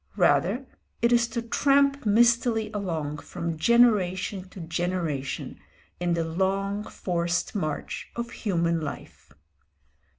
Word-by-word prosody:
Rather, 270 +3 +2 0.4
it 235 - +4
is 240 -1 +4
to 235 0 -4
tramp 275 +1 +2
mistily 230 0 +3
along 160 -7 -3
from 170 +1 -4
generation 195 -2 +2
to 185 - -11
generation 165 -5 -3 0.4
in 175 -1 +1
the 165 - 0
long, 195 +4 -1
forced 175 -1 -2
march 155 -8 -3
of 235 0 -4
human 170 -5 0
life. 155 - -8
190 Hz, 110 wpm, -26 LUFS, 170-230 Hz, 0.4 s, it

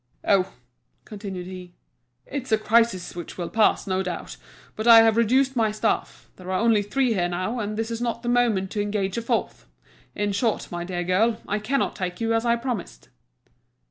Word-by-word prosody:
"Oh," 190 -1 +3 0.5
continued 200 -4 -7
he, 180 -1 -10 0.5
"it's 265 -3 -6
a 220 - +5
crisis 220 -5 +1
which 175 -1 -8
will 175 -2 -4
pass, 220 -1 +3
no 190 -1 0
doubt, 175 - -5 0.4
but 215 +2 -3
I 230 -1 +10
have 225 -1 +4
reduced 260 +4 +3
my 225 -3 +2
staff; 215 - -2
there 185 - -12
are 185 - 0
only 230 -2 +3
three 245 +4 0
here 175 -4 0
now, 185 +7 -2
and 210 -1 -3
this 225 +1 -2
is 230 0 -4
not 235 0 -2
the - - -5
moment 230 -6 +2
to 210 - -1
engage 205 0 -1
a - - -4
fourth. 230 - -2 0.5
In 205 0 -1
short, 215 +2 -1
my 175 0 -4
dear 175 0 -3
girl, 215 +6 +2
I 210 - -1
cannot 260 +6 -1
take 180 -2 -4
you 230 0 0
as 225 +1 0
I 235 - +4
promised." 235 - -5
215 Hz, 195 wpm, -24 LUFS, 185-230 Hz, 0.5 s, I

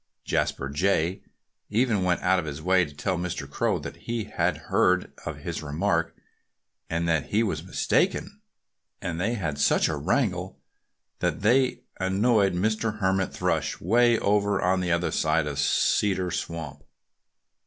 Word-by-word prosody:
Jasper 65 - -1
Jay 85 +4 0 0.5
even 110 -2 +1
went 90 -1 +1
out 95 0 +3
of 85 - -4
his 75 -1 -5
way 90 +2 +3
to 75 - -12
tell 90 +4 -1
Mr. 85 -5 -4
Crow 70 - 0
that - - -7
he 115 -1 -3
had - - -1 0.2
heard 90 0 +3
of - - -4
his - - -5
remark, 85 +3 -1 0.7
and 85 +1 -1
that 80 -2 +1
he 110 +3 +2
was 110 - -2
mistaken. - - 0 0.6
And 85 -1 -4
they 115 +6 0
had 80 -9 -3
such 70 - +3
a 80 - -1
wrangle 90 - -1 0.6
that - - -1
they 125 +5 +3 0.2
annoyed 100 +2 +2
Mr. 110 +3 0
Hermit 95 -2 +1
Thrush, - - -1
way 120 +5 +4
over 100 -1 +1
on 90 +1 +2
the 90 -1 -1
other 85 +1 +1
side 80 0 +1
of 70 -2 -4
Cedar 95 +5 +2
Swamp. 85 -2 -5
90 Hz, 155 wpm, -26 LUFS, 85-105 Hz, 0.7 s, way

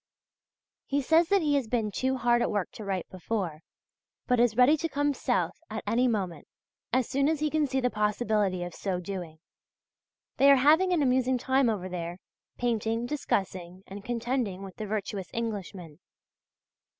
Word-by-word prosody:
He 280 - +1
says 325 +4 +4
that 400 -3 +3
he 295 -1 +2
has 275 -5 +1
been 220 -2 -1
too 260 +4 0
hard 240 0 +2
at - - +1
work 205 -3 -1
to 215 - -9
write 195 -3 -3
before, 185 -4 -3 0.7
but 250 -2 +2
is 240 -2 +3
ready 255 +5 +6
to 330 +2 -2
come 290 0 0
south - - -1
at - - -5
any 245 +2 +2
moment, 190 -9 -2 0.4
as 255 0 +2
soon 275 +2 +1
as 315 -2 0
he 305 0 0
can 310 -2 +2
see 265 0 0
the 250 -1 0
possibility 210 -3 0
of 175 - -6
so 190 -3 -2
doing. 180 -3 -6 1.0
They 275 - +6
are 280 - +9
having 310 +8 +4
an 335 -5 +2
amusing 255 0 +2
time 265 0 +2
over 195 -4 -2
there, 175 -1 -5 0.4
painting, 230 -1 0
discussing, 190 -9 -3
and 200 +1 -9
contending 235 -4 -2
with 195 -1 -10
the 215 - -5
virtuous 200 -2 -3
Englishmen. 195 -8 -5
230 Hz, 175 wpm, -28 LUFS, 195-265 Hz, 1.0 s, are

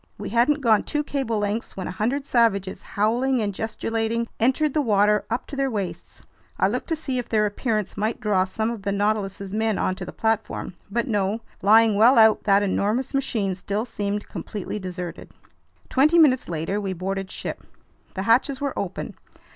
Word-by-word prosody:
We - - -5
hadn't 245 +6 +2
gone 225 -5 +4
two 295 -1 -2
cable 270 -6 -2
lengths 205 +2 -3
when 190 - -4
a - - -4
hundred 240 +9 -1
savages, 200 -7 +1
howling 240 +5 +1
and 205 -2 -1
gesticulating, 225 +2 -2
entered 265 +5 +2
the 305 - +2
water 210 -3 +3
up 235 +2 -2
to - - -8
their 275 0 0
waists. 200 -6 -5 0.3
I - - +3
looked - - -3
to 325 - +1
see 270 -5 -3
if 240 - -6
their 215 -2 +2
appearance 215 0 -2
might 215 +2 -1
draw 200 -3 +2
some 220 +4 -2
of 230 -3 -6
the 200 +1 -2
Nautilus's 200 -1 -1
men 220 -1 +1
onto 185 0 -1
the 180 - -6
platform. 220 -3 -2 0.2
But 235 +6 -1
no. 210 0 0 0.2
Lying 220 +2 +6
well 230 +6 +5
out, 220 -1 +5
that 200 0 +4
enormous 210 +7 0
machine 220 -8 0
still 200 +4 -3
seemed 205 -3 -3
completely 210 0 -5
deserted. 180 -2 -6 0.6
Twenty 300 +6 +4
minutes 270 - +4
later 170 +5 -2
we 195 -2 -2
boarded 190 +2 -3
ship. - - -6 0.5
The 190 - -2
hatches 255 +5 +3
were 280 -2 -2
open. 190 -2 -4
215 Hz, 180 wpm, -24 LUFS, 200-240 Hz, 0.6 s, Lying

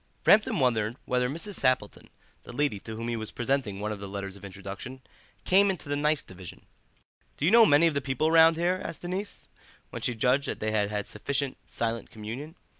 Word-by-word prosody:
Framton 215 +1 +5
wondered 115 -4 +1
whether 125 0 +1
Mrs. 170 +7 -4
Sappleton, 130 0 0 0.3
the - - -11
lady 140 -5 0
to 110 +2 -8
whom 115 +1 -5
he 120 - -1
was 110 -1 -5
presenting 120 -5 -1
one 105 +1 -2
of 105 - -5
the 100 - -7
letters 100 0 -5
of 100 - -14
introduction, 100 +7 -8 0.4
came 195 +2 +5
into 185 -6 -4
the 145 - -1
nice 150 +1 +1
division. 95 -2 -11 0.7
"Do 145 - -1
you 175 - +4
know 230 -1 +8
many 145 +3 +5
of 165 - +3
the 140 - 0
people 140 +4 0
round 165 0 +7
here?" 175 +3 0
asked 160 - -7
the - - -4
niece, 190 +2 -5 0.4
when - - -6
she 120 - 0
judged 130 +5 +2
that - - -4
they 110 0 -1
had 105 -2 +1
had 105 -1 -3
sufficient 140 +5 -2
silent 115 0 -3
communion. 120 +9 -7
130 Hz, 210 wpm, -28 LUFS, 110-155 Hz, 0.7 s, know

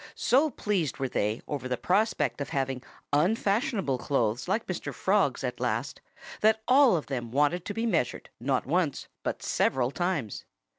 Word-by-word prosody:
So 275 +6 +3
pleased 200 - -1
were 135 -2 -1
they 105 0 -1
over 140 -3 -3
the 125 -1 -1
prospect 200 - +1
of 140 - -3
having 135 -2 -1 0.3
"unfashionable" 195 - +1
clothes 120 -1 0
like 215 +5 0
Mr. - - -4
Frog's - - +1
at - - -3
last - - -2 0.4
that 220 +1 +3
all 255 -6 +6
of 155 - -4
them 120 -4 -4
wanted 150 +7 +1
to - - -3
be 225 - -1
measured 165 - -1
not 130 +2 0
once 160 0 0
but - - -3
several 130 -1 +1
times. 175 - -2
155 Hz, 160 wpm, -28 LUFS, 130-210 Hz, 0.4 s, all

